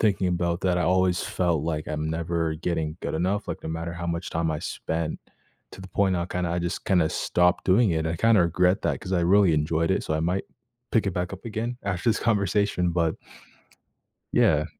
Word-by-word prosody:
thinking 100 -4 +2
about 85 -1 0
that 90 -2 +2
I 90 - +1
always 90 -1 +2
felt 85 -5 0
like 80 -2 -2
I'm 75 0 -2
never 80 0 -1
getting 80 -2 -2
good - - -3
enough, 95 +5 -1
like, 85 - -5
no - - -5
matter 85 +1 -4
how 85 0 -5
much 85 +2 -3
time 80 0 0
I 75 - -2
spent 80 -1 -3 0.5
to - - -10
the 95 - -9
point 95 0 +1
I 85 0 -2
kinda 90 -1 -2
I 85 - 0
just 85 +1 -3
kinda 90 -5 +3
stopped 90 0 +1
doing 100 +3 +4
it, 80 0 0
I 80 - -1
kinda 115 +2 +4
regret 90 +3 +2
that - - -1
'cause 95 - -6
I 90 - +2
really 95 -1 +4
enjoyed 80 +3 +1
it, - - -1
so - - -2
I 80 - 0
might 90 +4 0 0.5
pick 110 -3 +2
it 100 - 0
back 90 +1 -3
up 95 - -9
again 115 +2 -3
after 100 +2 -1
this 110 - 0
conversation, 100 -4 +1
but 85 -2 +1 1.2
Yeah. - - +3
90 Hz, 215 wpm, -25 LUFS, 80-95 Hz, 1.2 s, doing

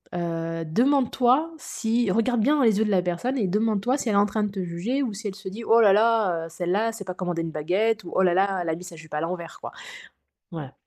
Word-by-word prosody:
heu, 165 -1 -3
demande-toi 260 - +2
si 230 -5 -1
regarde 230 +4 +1
bien 290 +7 +3
dans 275 - +2
les 220 -4 +4
yeux 220 - +2
de 210 - -1
la 190 -2 +3
personne, 180 +10 -2
et 210 -6 0
demande 210 +2 +1
toi 250 +6 +1
si 265 - -5
elle 210 - +1
est - - +4
en 200 - +5
train 210 +1 -1
de 210 - -2
te 195 -2 -4
juger, 185 +11 -2
ou 235 -5 -3
si 215 +2 -6
elle 195 - -5
se 195 -1 -8
dit: 220 +5 -8
"Oh 230 +1 +5
là 205 -3 +6
là, 210 -6 +2
heu, - - -9
celle-là, 180 +6 -1
elle - - -5
sait 220 - -7
pas 185 -1 -5
commander 175 -2 -3
une 165 -1 -4
baguette" 195 +9 0
ou 170 - -8
"Oh - - +3
là 180 -2 +3
là, 195 +1 +1
elle 170 - -3
a 160 - 0
mis 175 - -10
sa 175 -2 -10
jupe 155 -1 -14
à 150 - -1
l'envers", 170 0 -5
quoi.» - - -7 0.8
ouais. 150 -5 -7
200 Hz, 280 wpm, -25 LUFS, 175-225 Hz, 0.8 s, là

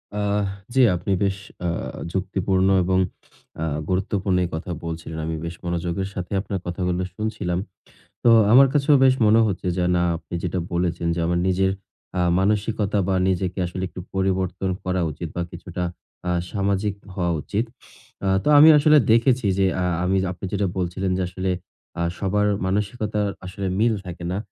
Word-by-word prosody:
আহ! 105 0 0 0.3
জি 135 - +2 0.2
আপনি 95 +3 -3
বেশ 95 -1 +1 0.3
আ - - +1 0.4
যুক্তিপূর্ণ 95 0 0 0.2
এবং 95 +1 +2 0.6
আ - - 0 0.2
গুরুত্বপূর্ণ 95 0 0
এই 85 - -5
কথা 85 +3 -5
বলছিলেন। 80 -1 -5
আমি 80 0 -2
বেশ 85 +1 -5
মনোযোগের 85 +2 -2
সাথে 90 +1 -6
আপনার 100 -2 -4
কথাগুলো 90 +1 -1
শুনছিলাম। 105 -5 -2 0.7
তো 120 - +7 0.2
আমার 135 +3 +9
কাছেও 145 0 +4
বেশ 130 - +6
মনে 110 +2 +6
হচ্ছে 95 -3 -3
যে, 90 - +1
না, 85 - +2
আপনি 85 - -9
যেটা 90 0 -2
বলেছেন 85 -1 -1
যে 85 - -2
আমার 85 +1 +1
নিজের 95 +1 +2 0.5
আ - - +2 0.2
মানসিকতা 105 +1 +1
বা 95 - +2
নিজেকে 95 0 -1
আসলে 90 +2 -5
একটু 90 - -9
পরিবর্তন 95 0 0
করা 90 0 0
উচিত 80 +3 -6
বা 90 - 0
কিছুটা 90 +1 -5 0.4
আ - - +1 0.2
সামাজিক 100 0 0 0.2
হওয়া 90 -3 0
উচিত। 105 +9 -1 0.6
আ - - 0 0.2
তো - - +1
আমি 155 +2 +9
আসলে 150 +1 +6
দেখেছি 120 0 +3
যে 95 - +4 0.2
আ - - +1 0.2
আমি 95 +1 +2 0.2
আপনি 90 - -10
যেটা 100 -1 +1
বলছিলেন 95 +1 -1
যে 95 - 0
আসলে 95 +1 -3 0.5
আ - - +1 0.2
সবার 105 +1 +1 0.2
মানসিকতার 105 +1 -1 0.2
আসলে 95 +1 -5
মিল 115 +1 +3
থাকে 85 -1 -7
না। 95 - -1
95 Hz, 165 wpm, -23 LUFS, 90-105 Hz, 0.7 s, আমার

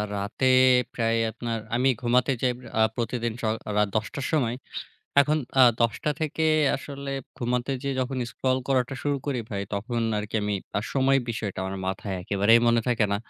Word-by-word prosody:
রাতে 100 +6 -2 0.5
প্রায় 115 -1 +1
আপনার 115 -1 -4 0.2
আমি 130 +2 +3
ঘুমাতে 125 +2 +2
যাই 125 - +2
প - - -15 0.2
আ - - +5
প্রতিদিন 120 -1 -2
স - - -15 0.3
রাত 105 -1 +3
১০ঃ০০ 110 +6 -2
র - - -3
সময়। 125 -6 +1 0.7
এখন 150 +2 +2 0.2
আ - - +9 0.2
১০ঃ০০ 115 +7 +1
থেকে 160 +1 0 0.3
আসলে 140 0 -6 0.2
ঘুমাতে 125 +2 -1
যেয়ে 140 -1 -2
যখন 130 +1 -2
scroll 130 +3 0
করাটা 130 -1 +1
শুরু 145 -1 0
করি 130 -4 -1
ভাই 100 -2 -2
তখন 115 +4 -2 0.2
আরকি 105 +1 -6
আমি 105 0 -1 0.2
আ - - -1
সময়ের 135 0 +3
বিষয়টা 110 -4 -4
আমার 95 +1 -4
মাথায় 95 +1 -3
একেবারেই 100 +5 +4
মনে 115 0 +4
থাকে 115 -3 +2
না। - - +2
120 Hz, 175 wpm, -26 LUFS, 110-135 Hz, 0.7 s, আ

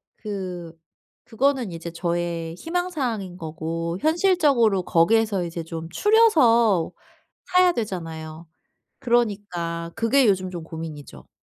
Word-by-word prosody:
그 185 -5 -6 0.5
그거는 250 -4 0
이제 165 0 -6
저의 170 -1 -3
희망 355 - -2
사항인 225 - -3
거고 165 +1 -4
현실적으로 300 - +3
거기에서 200 +3 +2
이제 170 -1 -5
좀 165 0 -6
추려서 235 - +4 0.5
사야 365 -1 +4
되잖아요. 165 -6 -5 0.5
그러니까 200 -9 -1
그게 240 +3 +3
요즘 185 -2 +1
좀 170 -3 -7
고민이죠. 155 - -9
185 Hz, 255 characters per minute, -23 LUFS, 165-240 Hz, 0.5 s, 추려서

